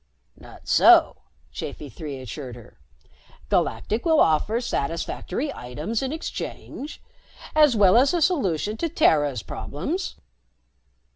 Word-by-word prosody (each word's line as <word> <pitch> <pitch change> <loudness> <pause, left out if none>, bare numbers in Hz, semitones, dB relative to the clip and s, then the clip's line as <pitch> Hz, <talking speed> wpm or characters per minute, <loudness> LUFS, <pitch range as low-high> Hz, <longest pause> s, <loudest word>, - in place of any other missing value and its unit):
"Not - - -15
so," - - +6 0.4
Chafi 150 - -6
Three 145 -5 -6
assured 130 0 -7
her. 120 - -15 0.7
"Galactic 210 - 0
will 320 -3 +3
offer 165 +9 +3
satisfactory 190 - -3
items 150 - -4
in 265 0 -2
exchange, 310 -1 -6 0.5
as 300 -5 +5
well 200 -2 +5
as 265 +3 +5
a 350 - +1
solution 215 - 0
to 335 - -2
Terra's 145 - +2
problems." 285 - -4
210 Hz, 115 wpm, -24 LUFS, -, 0.7 s, so